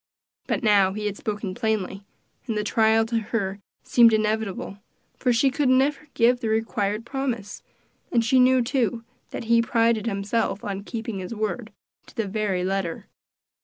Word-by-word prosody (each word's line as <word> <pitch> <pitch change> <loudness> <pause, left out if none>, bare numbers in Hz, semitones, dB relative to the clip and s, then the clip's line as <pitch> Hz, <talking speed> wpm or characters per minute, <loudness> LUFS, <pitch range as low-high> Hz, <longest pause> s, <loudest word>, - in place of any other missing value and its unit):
But - - -1
now 200 -3 +4
he 210 +1 -4
had 205 -1 -2
spoken 205 -2 -4
plainly, 210 -3 -2 0.4
and 225 -3 -2
the 210 - 0
trial 220 +1 +3
to 230 0 0
her 205 -3 -3 0.2
seemed 235 -2 +5
inevitable, 215 -2 -1 0.4
for 250 - +1
she 250 +3 +3
could 280 -1 +1
never 275 +3 +2
give 245 +1 +4
the 225 - -2
required 215 0 -1
promise, 240 -7 -4 0.5
and 230 -2 +2
she 260 +3 +4
knew, 255 0 +5
too, 235 -3 -1 0.3
that - - -6
he 230 0 +4
prided 230 -1 +1
himself 200 0 -1
on 200 -1 -4
keeping 225 -3 -5
his 185 +5 -6
word, 220 +1 -3 0.4
to - - -17
the 225 -4 -1
very 195 -3 -1
letter. 190 -3 -2
220 Hz, 165 wpm, -24 LUFS, 200-235 Hz, 0.5 s, seemed